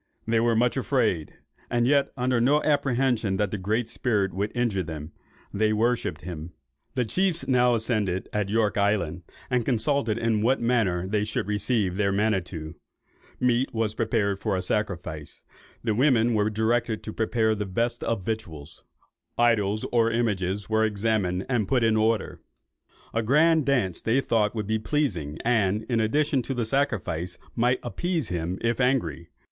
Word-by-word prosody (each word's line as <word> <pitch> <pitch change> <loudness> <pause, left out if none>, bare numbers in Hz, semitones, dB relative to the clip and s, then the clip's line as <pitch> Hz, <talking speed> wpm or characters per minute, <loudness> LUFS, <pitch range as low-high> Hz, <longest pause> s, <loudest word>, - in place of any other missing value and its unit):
They 115 0 +2
were 115 0 +2
much 120 +3 +2
afraid, 115 - 0 0.3
and 120 0 +1
yet 140 +2 +3
under 125 -1 +1
no 145 +5 +3
apprehension 125 -8 +1
that 105 -2 0
the 105 - -2
Great 110 +5 -1
Spirit 100 -8 0
would 100 +3 -2
injure 120 -6 0
them. 80 -2 -7 0.4
They 110 +1 +2
worshipped 115 +3 0
him. 85 -1 -7 0.4
The 125 -2 +1
chiefs 180 - 0
now 125 -2 +4
assembled 105 -5 -1
at 105 -2 -1
York 110 -1 +1
Island, 95 -5 0 0.3
and 125 -1 +2
consulted 115 -1 0
in 115 -2 +1
what 130 +5 +2
manner 105 -7 +1
they 105 +1 0
should 105 -3 -2
receive 105 -2 0
their 100 -1 +2
Manitto: 95 -6 -1 0.7
meat 125 +1 +1
was 110 -1 0
prepared 105 -3 0
for 105 -1 -1
a 90 - -3
sacrifice; 90 -7 -3 0.4
the 115 -2 +1
women 120 -1 +3
were 105 -1 +2
directed 110 +1 0
to 110 - -6
prepare 110 -1 +1
the 105 -1 -3
best 115 +6 -1
of 100 -6 -2
victuals; 85 -10 -5 0.5
idols 110 -3 +2
or 115 -1 +3
images 105 -4 -1
were 110 0 +2
examined 105 -4 0
and 120 -6 0
put 125 +2 +2
in 110 -1 +3
order; 110 -1 0 0.7
a 115 - +1
grand 150 +6 +3
dance 120 -11 +1
they 115 +4 +2
thought 110 -4 +1
would 105 -2 -2
be 110 +2 0
pleasing, 105 - -1
and, 110 -3 +2
in 115 0 -1
addition 145 +5 +1
to 135 +3 -4
the 120 -2 -1
sacrifice, 90 - -1 0.2
might 125 +2 +2
appease 165 - -2
him, 85 +1 -2
if 115 +1 0
angry. 125 -10 0
110 Hz, 165 wpm, -26 LUFS, 100-120 Hz, 0.7 s, now